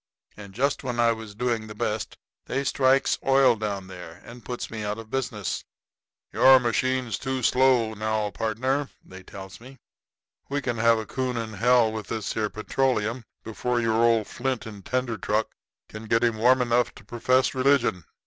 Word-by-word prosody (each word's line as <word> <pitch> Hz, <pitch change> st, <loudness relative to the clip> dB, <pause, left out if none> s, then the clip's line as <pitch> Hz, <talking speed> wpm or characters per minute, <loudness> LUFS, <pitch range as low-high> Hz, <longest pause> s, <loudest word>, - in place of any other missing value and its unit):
And 100 Hz, -2 st, -12 dB
just 140 Hz, +5 st, 0 dB
when 125 Hz, -2 st, -3 dB
I 115 Hz, 0 st, +4 dB
was 110 Hz, -2 st, -7 dB
doing 115 Hz, -1 st, -1 dB
the 105 Hz, -, -9 dB
best 105 Hz, +1 st, -3 dB, 0.3 s
they 135 Hz, +2 st, -1 dB
strikes 135 Hz, 0 st, +2 dB
oil 135 Hz, -2 st, +4 dB
down 105 Hz, -3 st, -4 dB
there 90 Hz, -3 st, -10 dB
and 120 Hz, +1 st, -12 dB
puts 125 Hz, -1 st, -6 dB
me 110 Hz, -1 st, -5 dB
out 105 Hz, +1 st, -3 dB
of 115 Hz, -1 st, -10 dB
business. 120 Hz, -8 st, -3 dB, 0.7 s
'Your 130 Hz, 0 st, +7 dB
machine's 125 Hz, -1 st, -1 dB
too 130 Hz, -1 st, -3 dB
slow, 125 Hz, -3 st, +3 dB
now, 110 Hz, -1 st, -2 dB
pardner,' 130 Hz, +7 st, -1 dB, 0.2 s
they 95 Hz, 0 st, -12 dB
tells 95 Hz, +1 st, -11 dB
me. 130 Hz, +3 st, -13 dB, 0.7 s
'We 140 Hz, 0 st, -2 dB
can 120 Hz, -2 st, -2 dB
have 115 Hz, 0 st, +4 dB
a 110 Hz, -, -4 dB
coon 130 Hz, +1 st, -3 dB
in 110 Hz, -1 st, -4 dB
hell 120 Hz, +1 st, +3 dB
with 110 Hz, -2 st, -6 dB
this 110 Hz, -3 st, -3 dB
here 110 Hz, -1 st, -1 dB
petroleum 120 Hz, +1 st, -1 dB, 0.2 s
before 120 Hz, +2 st, -2 dB
your 115 Hz, -1 st, +1 dB
old 115 Hz, -2 st, +3 dB
flint 130 Hz, +2 st, -3 dB
and 105 Hz, -3 st, -9 dB
tinder 125 Hz, 0 st, -2 dB
truck 110 Hz, +1 st, -1 dB, 0.4 s
can 110 Hz, +1 st, -9 dB
get 115 Hz, +2 st, +2 dB
him 115 Hz, -2 st, +1 dB
warm 125 Hz, +3 st, +4 dB
enough 120 Hz, 0 st, +1 dB
to -, -, -14 dB
perfess 125 Hz, +3 st, +1 dB
religion.' 130 Hz, -, +2 dB
115 Hz, 175 wpm, -25 LUFS, 110-130 Hz, 0.7 s, Your